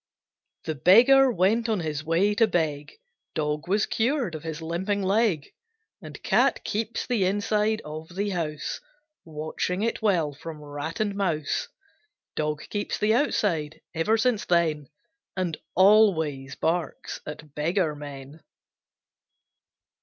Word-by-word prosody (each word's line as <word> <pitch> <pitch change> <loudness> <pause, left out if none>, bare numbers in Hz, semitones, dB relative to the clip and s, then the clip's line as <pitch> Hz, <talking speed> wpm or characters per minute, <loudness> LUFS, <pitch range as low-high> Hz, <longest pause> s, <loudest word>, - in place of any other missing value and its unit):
The 160 - -2
Beggar 245 - +6
went 225 +4 +2
on 215 -5 +1
his 155 -2 -3
way 170 +6 +2
to 225 +2 +4
beg; 155 -6 -1 0.4
Dog 150 0 -2
was 205 +3 +2
cured 240 - 0
of 155 - -5
his 160 0 -5
limping 185 +5 -2
leg; 195 -5 +1 0.5
And - - -10
Cat - - +2
keeps 220 +2 -2
the 235 -6 +1
inside 210 +2 +1
of 155 +3 -8
the 200 +1 -1
house, 155 -5 -3 0.5
Watching 160 +4 -3
it 230 - -1
well 175 -9 +1
from 155 +2 -9
rat 145 +2 -6
and 210 -2 0
mouse, 170 -7 -1 0.7
Dog 150 0 -2
keeps 205 -1 -2
the 215 +1 +2
outside, 170 - 0
ever 170 +8 +2
since 225 -2 +1
then, 160 -5 +1 0.5
And 175 -4 -1 0.2
always 165 -9 +4
barks 165 +1 -2
at 150 -1 -9
beggar 160 +1 0
men. 145 +1 -9
170 Hz, 130 wpm, -26 LUFS, 155-210 Hz, 0.7 s, Beggar